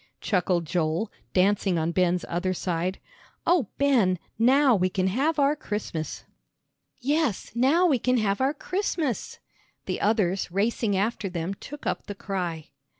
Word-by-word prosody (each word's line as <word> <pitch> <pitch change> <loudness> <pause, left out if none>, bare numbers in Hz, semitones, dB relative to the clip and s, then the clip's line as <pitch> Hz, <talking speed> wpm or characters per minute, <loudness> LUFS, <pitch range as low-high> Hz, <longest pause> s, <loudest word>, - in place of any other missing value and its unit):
chuckled 180 -3 +1
Joel, 165 +5 -1 0.2
dancing 195 -1 +2
on 160 +1 0
Ben's 180 0 +1
other 185 +2 -1
side. 180 +1 -2 0.5
"Oh, 335 - +3
Ben, 240 -10 +3 0.2
now 260 +2 +5
we 185 -1 +2
can 185 0 -1
have 275 - +1
our 285 +1 +3
Christmas!" 205 - -4 0.7
"Yes, 285 - 0
now 275 +10 +3
we 285 -8 +3
can 250 +2 +2
have 205 0 0
our 275 +3 +2
Christmas!" 330 - -2 0.5
The - - -3
others 195 -4 +1
racing 205 +1 +1
after 205 0 -1
them 175 +1 -3
took 290 +8 -10
up - - -2
the 205 - -5
cry. 180 -6 -4
200 Hz, 145 wpm, -26 LUFS, 180-265 Hz, 0.7 s, now